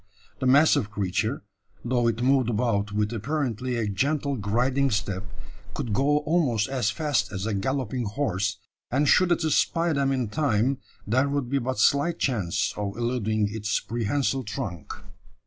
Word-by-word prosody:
The 130 - 0
massive 135 -5 +4
creature, 105 +5 -2 0.4
though 120 -1 +1
it 115 +1 0
moved 130 -2 +3
about 105 -3 0
with 105 +2 -1
apparently 125 0 -2
a 115 -2 -1
gentle 140 +8 0
griding 125 +6 +1
step, 105 -3 -2 0.5
could 125 -7 -3
go 140 +6 +3
almost 145 -9 +1
as 130 -6 0
fast 125 -5 0
as 95 0 -4
a 110 - -1
galloping 130 +4 -2
horse; 105 -4 -1 0.3
and 140 +4 +1
should 185 +3 +4
it 170 -1 +2
espy 165 +2 +2
them 140 -1 +1
in 130 -5 -1
time, 130 -1 +1 0.3
there 130 +6 +2
would 140 -3 -2
be 140 - +2
but 130 0 -3
slight 145 +9 +3
chance 105 -5 0
of 100 0 -4
eluding 110 -3 0
its 110 -1 -1
prehensile 130 +4 -1
trunk. 100 - -5
120 Hz, 155 wpm, -26 LUFS, 105-140 Hz, 0.5 s, massive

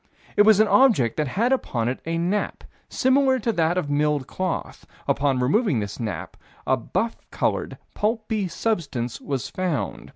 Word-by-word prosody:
It - - +5
was 210 -1 +6
an 215 - +5
object 205 - +4
that 155 -2 0
had 225 - 0
upon 120 - -1
it 125 - -2
a 165 0 -1
nap, 180 +5 -1 0.3
similar 260 0 +3
to 235 -1 0
that 170 -3 +1
of 180 - -1
milled 145 -1 +1
cloth. 185 +4 -4 0.2
Upon 140 -2 +1
removing 175 - +2
this 100 -1 -5
nap, 110 -5 -5 0.3
a 130 - +3
buff 220 - -2
colored, - - -1 0.2
pulpy 215 -2 -1
substance 155 - -2
was 135 -4 -3
found. 180 -6 -3
170 Hz, 160 wpm, -24 LUFS, 135-220 Hz, 0.3 s, was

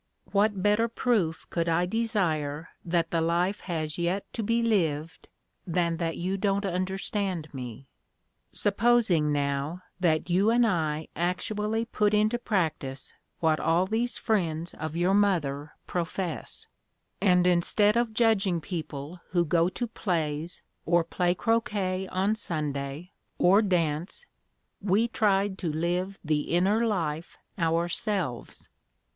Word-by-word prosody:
What 200 -1 +2
better 210 +3 +3
proof 220 -9 0
could 170 -1 0
I 170 +2 +2
desire 175 -9 -1
that 170 -1 0
the 165 - +1
life 175 +4 +1
has 160 -3 -3
yet 175 +3 0
to 230 - -3
be 230 +2 +1
lived 165 -8 0 0.4
than 170 -1 +1
that 165 -1 -2
you 185 +3 -1
don't 200 0 0
understand 185 -2 -2
me? 125 0 -7 0.6
Supposing, 205 -7 +2
now, 145 +4 -1 0.2
that 160 -4 +2
you 185 +4 +3
and 240 +1 +4
I 160 -6 0
actually 210 +5 -1
put 210 -2 +1
into 215 +3 +2
practice 155 - -2 0.3
what 160 -2 +3
all 170 +3 +2
these 225 +5 -1
friends 170 -6 -1
of 155 +1 -5
your 180 +3 +2
mother 155 -8 +1
profess, 175 -1 -4 0.6
and, 180 -3 +4
instead 180 +4 +3
of 235 -1 +1
judging 205 -7 +3
people 160 -1 -6
who 175 -2 +2
go 170 +2 +3
to 240 +6 -3
plays, 165 -7 -2 0.2
or 170 0 +3
play 175 +1 0
croquet 200 -4 0
on 190 +4 +1
Sunday, 150 -4 -4 0.3
or 195 +4 +5
dance, 175 - -1 0.6
we 205 +4 +2
tried 200 -3 +1
to 170 - -1
live 175 +5 -1
the 155 -2 0
inner 205 +6 +3
life 165 -6 -2 0.2
ourselves. 170 - -1
180 Hz, 130 wpm, -28 LUFS, 160-205 Hz, 0.6 s, or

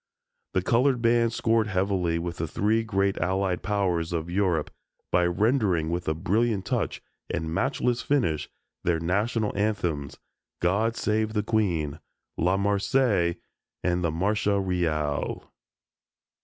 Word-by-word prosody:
The 95 - +2
colored 125 +5 +3
bands 115 0 +2
scored 115 -1 +2
heavily 95 -3 0
with 85 0 -4
the 80 - -2
three 110 +6 +1
great 100 -2 0
Allied 95 -1 0
Powers 95 -5 0
of 85 0 -3
Europe 90 -5 +1 0.4
by 90 0 +3
rendering 95 - +1
with 85 +1 -3
a 80 - +1
brilliant 100 +3 0
touch - - -2 0.3
and 80 0 -2
matchless 125 +2 0
finish 115 - 0 0.3
their 85 -2 +1
national 105 +6 0
anthems, 90 -9 -1 0.4
"God 105 +6 +1
Save 110 0 0
the 105 -1 0
Queen," 85 -10 0 0.4
"La 90 +3 +2
Marseillaise" 100 -2 +2 0.5
and 90 0 +1
the 85 - +2
"Marcia 100 +4 +1
Reale." 80 -6 -1
95 Hz, 130 wpm, -26 LUFS, 85-110 Hz, 0.5 s, colored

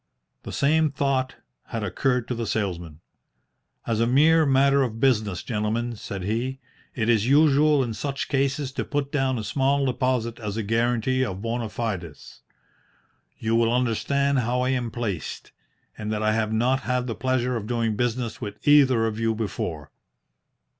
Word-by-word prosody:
The - - -8
same 155 +2 +2
thought 135 -2 -1 0.3
had 115 -2 -4
occurred 125 +5 0
to - - -2
the 115 -1 -3
salesman. 85 -7 -3 0.8
"As 115 -2 -1
a 115 - +2
mere 155 +5 +4
matter 140 +1 +4
of 115 -4 -2
business, 110 -8 +1
gentlemen," 115 +1 -2
said 100 -2 -6
he, 120 +7 -2 0.4
"it 110 -3 -1
is 115 -1 +3
usual 145 0 +4
in 115 -3 -3
such 140 +4 -3
cases 140 0 0
to 135 - -3
put 145 -1 -3
down 135 -3 0
a 110 - -4
small 135 +5 +1
deposit 125 -2 -1
as 105 -2 -4
a 110 - -1
guarantee 120 +4 +1
of 95 -4 -4
bona 115 -1 -2
fides. 95 - -5 1.0
You 110 0 -1
will 115 0 +3
understand 130 +3 +1
how 125 +1 0
I 130 - +1
am 125 -3 -1
placed, 105 -9 -5 0.4
and 105 0 -5
that 110 0 -2
I 110 0 +2
have 110 -1 0
not 125 +4 +2
had 125 0 -1
the 120 - -3
pleasure 125 0 0
of 110 -2 -4
doing 115 -2 0
business 120 +1 -2
with 105 +3 -7
either 130 -6 +5
of 110 -1 -3
you 115 -1 +1
before." 85 - -4
120 Hz, 165 wpm, -25 LUFS, 110-135 Hz, 1.0 s, either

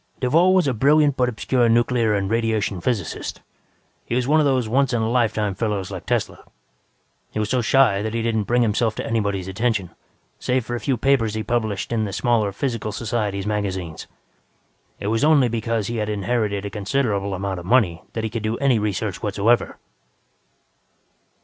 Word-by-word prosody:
"Duvall 165 +9 +4
was 185 -5 +3
a 135 - +1
brilliant 145 +4 +3
but 125 -2 +1
obscure 120 +1 +1
nuclear 115 -1 +2
and 100 -1 -1
radiation 110 -4 0
physicist. 105 -9 -3 0.6
He - - -3
was 125 0 0
one 155 +2 +4
of 150 - +3
those 130 -4 +1
once 130 +2 +1
in 120 - +1
a - - 0
lifetime 110 -4 +1
fellows 100 -2 -2
like 95 -4 -7
Tesla. - - -2 0.9
He - - -7
was 105 -1 -1
so 130 -1 +2
shy 115 -4 +3
that 110 +1 -3
he 115 - -1
didn't 110 -2 0
bring 120 +2 +2
himself 110 0 +1
to - - -4
anybody's 100 -5 -1
attention, 100 -2 -1 0.5
save 125 -2 0
for 120 - -3
a - - -3
few 130 +3 -1
papers 115 -4 +2
he 110 - -2
published 110 -5 -2
in 110 -2 0
the 100 - -5
smaller 110 -2 +1
physical 115 0 -3
societies' 105 -3 -2
magazines. 95 -6 -3 0.9
It - - -7
was 115 - 0
only 150 -4 +5
because 115 -1 -1
he 115 +3 -3
had 105 -1 -2
inherited 105 -1 -1
a 100 - -5
considerable 100 -2 -1
amount 95 -1 -3
of 85 - -10
money 95 -9 +3
that 110 - -3
he 110 - -1
could 115 -1 -3
do 110 +2 -2
any 135 -5 +2
research 105 -2 -2
whatsoever." 105 +3 +1
110 Hz, 185 wpm, -22 LUFS, 100-125 Hz, 0.9 s, only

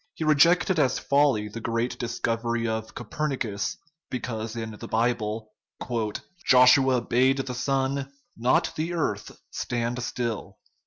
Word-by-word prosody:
He - - -4
rejected 170 +4 +4
as 130 -4 +2
folly 140 -7 +2
the 105 +2 -7
great 115 +2 -2
discovery 115 0 -1
of 110 0 -4
Copernicus, 125 -9 -3 0.3
because 115 -3 -4
in 110 -1 -4
the - - -7
Bible 110 -2 -1 0.5
" 180 - -7
Joshua 125 0 +6
bade 130 +3 +2
the 135 -1 -3
sun, 135 +1 -1 0.2
not 130 +9 +2
the 165 +3 -2
earth, 105 -12 -2
stand 120 0 -2
still." 115 -5 -4
125 Hz, 125 wpm, -26 LUFS, 115-135 Hz, 0.5 s, Joshua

